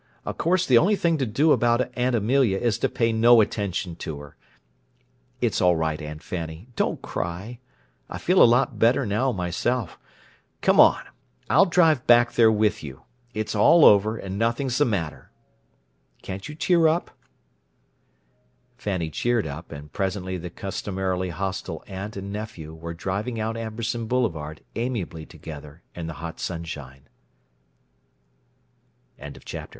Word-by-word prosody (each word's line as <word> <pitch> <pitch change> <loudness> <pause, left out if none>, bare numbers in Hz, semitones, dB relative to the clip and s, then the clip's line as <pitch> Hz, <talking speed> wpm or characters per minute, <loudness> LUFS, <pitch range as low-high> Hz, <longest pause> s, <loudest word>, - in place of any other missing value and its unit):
Of - - -5
course 180 +2 +2
the 125 -3 +6
only 205 - +3
thing 165 -5 +1
to 135 - 0
do 145 +9 +2
about 120 0 +2
Aunt 125 0 +1
Amelia 115 -1 +2
is 115 -1 0
to - - +1
pay 115 -1 0
no 115 +1 +6
attention 100 -5 -1
to 75 - -5
her. 70 0 -12 1.1
It's - - +1
all 90 -1 +4
right, 80 -1 -1
Aunt 75 0 -8
Fanny. 85 +3 -6
Don't - - -1
cry. 95 +8 -5 0.5
I - - -5
feel 185 +2 +3
a - - +10
lot 120 -2 +2
better 120 +4 +3
now, 110 +6 +1
myself. 95 +4 -2 0.6
Come - - +3
on; - - +7 0.5
I'll 200 - +6
drive 165 -6 +3
back 120 0 +6
there 115 -2 +5
with 105 -1 +1
you. 70 -3 -9 0.3
It's 110 0 -2
all 145 +10 +6
over, 105 +2 +5
and 95 -1 -5
nothing's 120 +3 0
the 145 - +5
matter. 90 - -3 0.9
Can't 95 +8 -6
you 150 - -7
cheer 165 +1 +3
up?" 165 +2 0 1.7
Fanny 90 -8 -3
cheered 120 +7 0
up; 80 +3 -7
and 75 +1 -10
presently 95 -1 -2
the 90 -1 -6
customarily 95 -1 -3
hostile 95 +3 -4
aunt 100 +2 -7
and 100 +1 -6
nephew 95 -7 -7
were 85 +1 -7
driving 100 +7 -3
out 110 +1 -2
Amberson 115 +1 -4
Boulevard 80 -12 -2
amiably 105 -10 -3
together 75 0 -11
in 85 -2 -6
the 80 - -5
hot 80 - -7
sunshine. 75 -6 -6
105 Hz, 145 wpm, -24 LUFS, 85-120 Hz, 1.7 s, a